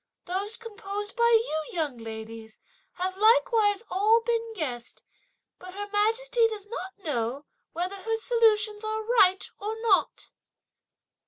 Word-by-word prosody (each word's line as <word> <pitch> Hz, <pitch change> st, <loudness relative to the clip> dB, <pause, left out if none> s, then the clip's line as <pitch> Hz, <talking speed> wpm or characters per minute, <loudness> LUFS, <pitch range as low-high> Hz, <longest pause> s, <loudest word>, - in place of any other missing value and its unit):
Those 395 Hz, +5 st, -3 dB
composed 415 Hz, -1 st, -6 dB
by 470 Hz, -1 st, +4 dB
you, 445 Hz, -9 st, +2 dB
young 300 Hz, -8 st, -2 dB
ladies, 220 Hz, 0 st, -8 dB, 0.4 s
have 370 Hz, +1 st, -3 dB
likewise 435 Hz, -1 st, +4 dB
all 430 Hz, +5 st, +4 dB
been 460 Hz, -1 st, -1 dB
guessed; 250 Hz, -, -5 dB, 0.6 s
but 365 Hz, +1 st, -11 dB
Her 410 Hz, 0 st, -4 dB
Majesty 455 Hz, +3 st, +2 dB
does 425 Hz, -3 st, -7 dB
not 380 Hz, -4 st, -7 dB
know 275 Hz, -, -3 dB, 0.3 s
whether 360 Hz, +4 st, -3 dB
her 450 Hz, +3 st, -2 dB
solutions 440 Hz, -2 st, +2 dB
are 435 Hz, 0 st, -2 dB
right 405 Hz, -5 st, +3 dB
or 435 Hz, +2 st, -4 dB
not." 415 Hz, -5 st, +1 dB
410 Hz, 130 wpm, -27 LUFS, 360-450 Hz, 0.6 s, by